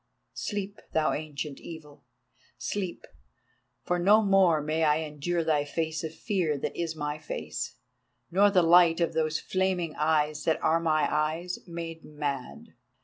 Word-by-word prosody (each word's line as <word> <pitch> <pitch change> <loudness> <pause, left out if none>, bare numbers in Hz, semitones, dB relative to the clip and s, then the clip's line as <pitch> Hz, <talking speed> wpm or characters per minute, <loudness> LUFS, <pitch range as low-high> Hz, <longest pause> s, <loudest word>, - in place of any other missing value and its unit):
Sleep, 205 0 -4
thou 155 -1 +2
Ancient 150 -1 -5
Evil. 150 -5 -11 0.5
Sleep, 190 -4 -4 0.8
for 175 0 0
no 210 +5 +5
more 190 -5 +4
may 155 +2 -1
I 150 0 +3
endure 160 +3 -2
thy 155 -2 +2
face 160 +2 -3
of 160 - -3
fear 170 -4 -1
that - - -4
is 165 -2 -2
my 150 0 -3
face, 155 - -5 0.6
nor 200 +4 +5
the 185 -3 +4
light 170 0 +6
of 170 - +1
those 155 -1 0
flaming 185 -4 -1
eyes 150 -1 +1
that 160 - +2
are 160 +1 +3
my 155 -2 +2
eyes 160 +4 -1
made 165 -1 -6
mad." 145 -4 -5
160 Hz, 145 wpm, -28 LUFS, 150-175 Hz, 0.8 s, light